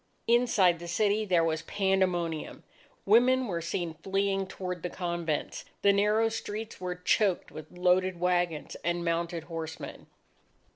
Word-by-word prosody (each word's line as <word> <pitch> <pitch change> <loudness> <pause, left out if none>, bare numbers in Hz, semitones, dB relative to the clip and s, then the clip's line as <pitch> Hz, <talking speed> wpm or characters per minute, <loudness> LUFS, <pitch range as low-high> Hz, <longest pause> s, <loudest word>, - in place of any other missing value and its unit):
Inside 225 -8 +3
the 170 - -8
city, 210 +4 +1
there 175 -4 +3
was 160 -1 0
pandemonium. 185 -5 -1 0.4
Women 250 +5 +5
were 175 -7 -3
seen 165 0 -3
fleeing 195 0 0
toward 180 -2 -5
the 180 - -3
convents. 170 -4 -3 0.2
The 200 - +6
narrow 210 +3 +3
streets 220 -2 -6
were 180 -1 -3
choked 185 +1 +1
with 155 0 -10
loaded 180 0 +2
wagons 175 -3 0
and 175 +1 -1
mounted 170 0 -1
horsemen. 160 -1 -7
180 Hz, 135 wpm, -29 LUFS, 170-200 Hz, 0.4 s, The